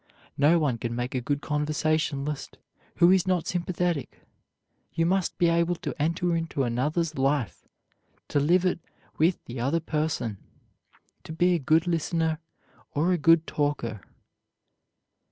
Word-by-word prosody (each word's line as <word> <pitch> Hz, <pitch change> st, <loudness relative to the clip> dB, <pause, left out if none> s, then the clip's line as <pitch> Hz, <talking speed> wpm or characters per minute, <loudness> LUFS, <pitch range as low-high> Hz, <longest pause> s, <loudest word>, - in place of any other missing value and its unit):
No 150 Hz, +4 st, +5 dB
one 140 Hz, -8 st, 0 dB
can 120 Hz, +1 st, -3 dB
make 120 Hz, +1 st, -3 dB
a 130 Hz, -, -1 dB
good 145 Hz, +3 st, -2 dB
conversationalist 150 Hz, -1 st, -1 dB, 0.4 s
who 170 Hz, +1 st, +6 dB
is 190 Hz, -1 st, +3 dB
not 180 Hz, -3 st, +1 dB
sympathetic. 175 Hz, -4 st, -2 dB, 0.7 s
You 165 Hz, -, 0 dB
must 185 Hz, +1 st, 0 dB
be 175 Hz, -, +3 dB
able 170 Hz, +1 st, +2 dB
to -, -, -5 dB
enter 170 Hz, +2 st, +1 dB
into 165 Hz, -4 st, -1 dB
another's 150 Hz, +6 st, -1 dB
life, 135 Hz, -, -1 dB, 0.6 s
to 145 Hz, -, +2 dB
live 175 Hz, +6 st, +3 dB
it 180 Hz, -, +1 dB, 0.4 s
with 165 Hz, +3 st, +2 dB
the 120 Hz, +1 st, -7 dB
other 140 Hz, +7 st, +1 dB
person, 150 Hz, -, -2 dB, 0.8 s
to -, -, -9 dB
be 175 Hz, +3 st, +2 dB
a 175 Hz, -, +1 dB
good 155 Hz, +4 st, +3 dB
listener 165 Hz, -1 st, 0 dB, 0.6 s
or 160 Hz, +5 st, +2 dB
a 180 Hz, -, +2 dB
good 165 Hz, +2 st, +5 dB
talker. 140 Hz, -8 st, -2 dB
155 Hz, 140 wpm, -26 LUFS, 140-170 Hz, 0.8 s, who